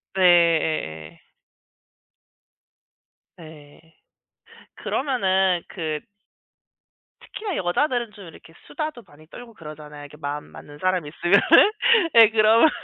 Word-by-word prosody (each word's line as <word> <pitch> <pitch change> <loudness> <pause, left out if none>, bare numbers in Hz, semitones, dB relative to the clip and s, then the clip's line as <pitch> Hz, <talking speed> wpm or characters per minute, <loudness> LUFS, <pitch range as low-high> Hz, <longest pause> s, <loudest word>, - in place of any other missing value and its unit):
네 190 - -1
예예. 160 - +1 2.2
네. 155 -3 -15 1.0
그러면은 190 - 0
그 155 -3 -5 1.2
특히나 415 -4 -7
여자들은 235 +6 -1
좀 200 - -13
이렇게 165 0 -16
수다도 305 -6 -6
많이 155 0 -20
떨고 235 +6 -13
그러잖아요 150 -4 -12
이렇게 145 +1 -13
마음 145 0 -6
맞는 145 0 -14
사람 185 -2 -1
있으면은. 190 - +3 0.4
예. 225 -2 +8
그러면 225 +5 +4
175 Hz, 230 characters per minute, -22 LUFS, 150-225 Hz, 2.2 s, 예